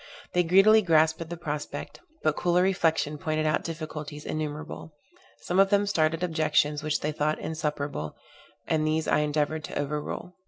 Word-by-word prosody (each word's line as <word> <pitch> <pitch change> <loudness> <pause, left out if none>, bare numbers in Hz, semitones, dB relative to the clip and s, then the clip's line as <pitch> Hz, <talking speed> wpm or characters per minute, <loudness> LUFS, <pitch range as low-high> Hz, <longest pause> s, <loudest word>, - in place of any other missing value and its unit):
They 180 - +4
greedily 195 +6 +6
grasped 160 -3 +3
at 165 - -6
the 170 - -5
prospect; 150 -3 -5 0.2
but 155 -1 +2
cooler 175 0 +2
reflection 160 -5 +1
pointed 155 0 -1
out 155 - +1
difficulties 155 -2 -6
innumerable: 155 0 -5 0.5
some 180 +2 0
of 195 0 +6
them 205 0 +3
started 165 -3 +1
objections 155 -3 +1
which 155 0 -1
they 150 - -1
thought 150 +1 0
insuperable, 150 - -3 0.5
and 155 -1 +1
these 155 0 0
I - - +3
endeavored 150 +1 0
to - - -6
overrule. 150 +5 -4
155 Hz, 160 wpm, -27 LUFS, 150-170 Hz, 0.5 s, greedily